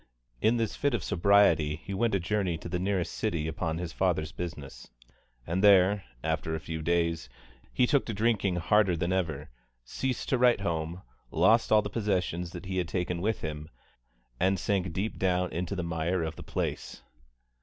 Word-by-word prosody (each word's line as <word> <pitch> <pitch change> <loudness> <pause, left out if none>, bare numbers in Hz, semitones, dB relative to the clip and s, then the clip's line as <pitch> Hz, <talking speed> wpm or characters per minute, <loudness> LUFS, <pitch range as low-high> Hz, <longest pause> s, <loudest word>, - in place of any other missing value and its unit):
In 115 +2 +3
this 115 -3 -1
fit 145 -3 +1
of 100 - -3
sobriety 85 -5 +3
he 95 +5 -8
went 110 +1 +1
a - - +2
journey 90 -2 -1
to 80 - -8
the 90 +1 -2
nearest 95 -3 -1
city 85 -8 -1
upon 80 0 -2
his 85 -1 -5
father's 80 -5 0
business, 70 -4 -7 0.6
and 90 +4 -1
there, 100 0 +5 0.2
after 80 0 -1
a - - -3
few 80 0 -5
days, 85 -3 0 0.4
he 125 - +3
took 140 +2 +1
to 115 - -2
drinking 105 -3 +1
harder 95 +1 +3
than 85 +3 0
ever, 80 -8 -2 0.3
ceased 130 - -3
to 130 - +2
write 120 -4 +4
home, 85 -1 -3 0.3
lost 110 +8 +3
all 105 -1 +5
the - - -3
possessions 90 -5 -1
that 90 0 -9
he 95 0 -3
had 90 - -1
taken 90 -1 -2
with 110 +3 -1
him, 75 0 -5 0.7
and 95 +1 +2
sank 95 -2 0
deep 100 +6 -3
down 90 -1 +1
into 85 +4 -3
the 90 - -2
mire 85 +1 -1
of 80 0 -4
the - - -10
place. - - -4
90 Hz, 185 wpm, -29 LUFS, 80-100 Hz, 0.7 s, there